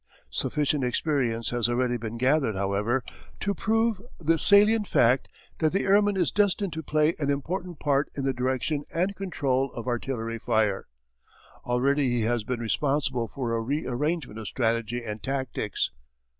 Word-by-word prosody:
Sufficient 150 -1 0
experience 125 -3 0
has 120 -1 +1
already 120 0 +1
been 115 -1 -5
gathered, 130 -2 +2
however, 100 +6 0 0.4
to 200 - 0
prove 225 +1 +1 0.2
the 165 0 +2
salient 210 +3 +5
fact 125 +2 +3 0.3
that 155 0 +2
the 195 - +1
airman 205 0 +3
is 175 -4 +2
destined 200 -3 +1
to 160 - -4
play 155 +1 +2
an 145 -2 0
important 175 +4 -3
part 145 0 +1
in 140 - -3
the 135 - +1
direction 130 +4 -1
and 185 +4 0
control 135 -9 -1
of 120 - -6
artillery 120 -2 -2
fire. 110 -3 +1 0.8
Already 135 +3 +2
he 120 -1 +1
has 115 0 0
been 120 +2 -3
responsible 130 0 0
for 120 +2 -3
a 115 - 0
re 140 +7 -2
arrangement 150 -2 -2
of 110 - -6
strategy 115 0 -1
and 105 -1 -5
tactics. 130 - -2
135 Hz, 155 wpm, -27 LUFS, 120-160 Hz, 0.8 s, salient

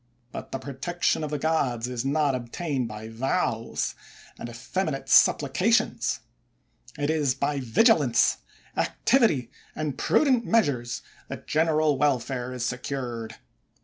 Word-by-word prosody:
But - - -8
the - - -2
protection 140 +6 -1
of 150 - -3
the 150 - -2
gods 135 -6 0
is 125 -1 -3
not 140 0 +1
obtained 130 +2 -3
by 110 0 -8
vows 115 0 -1 0.5
and 120 - -6
effeminate 135 +4 -3
suppli 140 +1 +5
cations; 225 - +1 0.8
it 145 +1 0
is 145 -5 +1
by 140 +1 -1
vigilance, 135 - +3 0.4
activity, 220 - +2 0.2
and 150 -3 -3
prudent 260 -6 +3
measures, 140 - 0 0.2
that - - -8
general 155 -2 +2
welfare 130 -3 0
is 125 -1 -3
secured. 120 -3 -4
135 Hz, 120 wpm, -26 LUFS, 125-155 Hz, 0.8 s, suppli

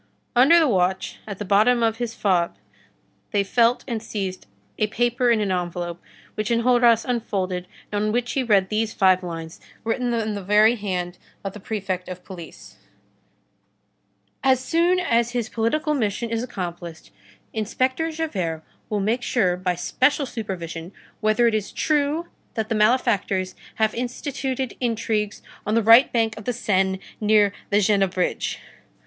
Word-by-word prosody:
Under 270 +8 +7
the 325 -2 +5
watch, 190 -4 0
at 200 -3 -5
the 205 - -5
bottom 215 +5 +4
of 225 -1 +1
his 235 -1 -4
fob, 180 -4 +1 0.7
they 205 -3 +1
felt 235 +4 +2
and 230 -4 -2
seized 190 - -5 0.3
a 215 - +2
paper 240 +3 +1
in 230 -2 +4
an 200 -2 0
envelope, 175 -1 -3 0.3
which 215 +1 -3
Enjolras 235 -1 +4
unfolded, 190 -7 -2 0.2
and 205 0 0
on 215 - +1
which 240 +1 -1
he 270 - 0
read 200 -6 +3
these 215 0 -1
five 185 -1 +4
lines, 165 -2 -7 0.2
written 240 +2 -1
in 220 -2 -1
the 200 - -4
very 210 +4 +4
hand 180 -5 -3 0.2
of 195 -1 -4
the 210 - -9
Prefect 190 -3 -4
of 180 0 -7
Police:— 165 - -11 1.7
"As 265 -1 +4
soon 335 +7 +2
as 235 -8 +1
his 240 -2 -2
political 270 +8 0
mission 230 -3 -1
is 230 0 0
accomplished, 175 -8 -6 0.4
Inspector 255 +8 0
Javert 190 - -3 0.3
will 210 -2 0
make 225 +5 0
sure, 195 -8 +1
by 180 0 -1
special 265 - +1
supervision, 175 -7 -6 0.3
whether 215 +2 +3
it 230 - +2
is 215 -2 -1
true 305 +2 0 0.3
that 220 -1 -2
the - - +1
malefactors 210 -4 +2 0.2
have 220 -1 +1
instituted 260 +1 -3
intrigues 220 -3 -1 0.2
on 215 - 0
the 230 - +3
right 230 +5 +7
bank 225 -2 +1
of 215 - -12
the 245 - 0
Seine, 190 -4 +1 0.2
near 210 -1 +4 0.2
the 205 - +3
Jena 200 -1 +3
bridge." 180 0 -2
215 Hz, 155 wpm, -23 LUFS, 190-240 Hz, 1.7 s, Under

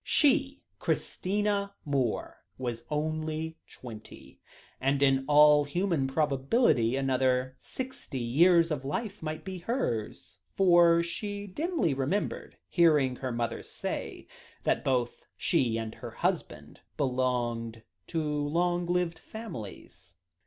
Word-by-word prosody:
She, 280 -1 +2 0.2
Christina 200 +1 -1
Moore, 135 -5 -1 0.2
was 120 -2 -4
only 155 +1 -2
twenty, 110 -4 -11 0.4
and 135 +1 +1
in 135 -1 +4
all 150 0 +7
human 165 -1 0
probability 135 - +2
another 130 -1 +1
sixty 260 - -7
years 165 +8 +4
of 140 -3 -2
life 205 - -4
might 155 0 -5
be 190 -1 -5
hers, 175 - -3 0.2
for 175 -3 +5
she 205 +4 -4
dimly 245 - -1
remembered 140 +10 -2
hearing 150 -7 +3
her 130 -1 -3
mother 120 -1 -2
say - - -5 0.4
that - - +1
both 125 -2 -1
she 115 -3 +1
and 110 -1 -4
her - - -8
husband - - -3 0.2
belonged 120 -4 -1 0.2
to 165 -2 -1
long 170 +4 0
lived 175 -1 0
families. 100 - -9
150 Hz, 110 wpm, -29 LUFS, 130-180 Hz, 0.4 s, all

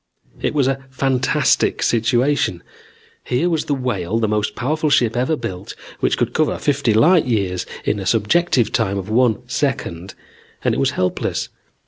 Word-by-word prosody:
"It - - -1
was 140 -3 +2
a 135 0 -1
fantastic 135 +2 +1
situation. 120 -4 +1 0.6
Here 165 +8 0
was 160 -2 0
the 145 - 0
Whale, 120 -6 -2
the 115 -1 +1
most 105 0 -1
powerful 155 +6 -1
ship 120 -5 +2
ever 130 +6 +1
built, 100 -8 -6 0.2
which - - +1
could - - -1
cover 155 -1 +1
fifty 140 -5 +1
light 155 +9 +4
years 95 -7 -1 0.2
in - - 0
a - - -4
subjective 130 - +2
time 100 +1 0
of 95 +2 -5
one 120 0 +2
second, 100 - -3 0.5
and - - +2
it - - -1
was - - +2
helpless. 90 0 -1
125 Hz, 160 wpm, -20 LUFS, 105-145 Hz, 0.6 s, light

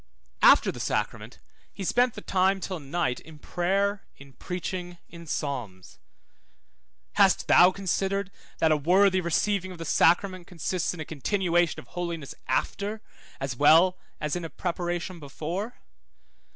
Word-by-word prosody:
After - - +6
the - - -10
sacrament - - -3 0.3
he 195 - -7
spent 245 +5 +2
the 210 - -7
time 190 0 +1
till 185 -2 -4
night 145 -2 -2
in 160 -1 -14
prayer, 195 +6 -1
in 140 -1 -15
preaching, 180 +4 -5
in 170 -1 -12
psalms: 120 - -5 1.2
hast 195 -2 +4
thou 180 - +7
considered 195 +1 -2 0.3
that 160 - +3
a 155 - +4
worthy 185 +5 +4
receiving 185 +3 0
of 180 - -9
the 165 - -6
sacrament 185 +3 +2
consists 180 0 -2
in - - -11
a 155 - -4
continuation 175 +2 0
of - - -14
holiness 170 -5 -5
after, 205 +11 -2 0.4
as 135 -2 -3
well 165 +7 +5 0.2
as 150 +1 -2
in 175 - -4
a 165 - -5
preparation 175 0 -3
before? 165 - -5
175 Hz, 140 wpm, -27 LUFS, 155-190 Hz, 1.2 s, thou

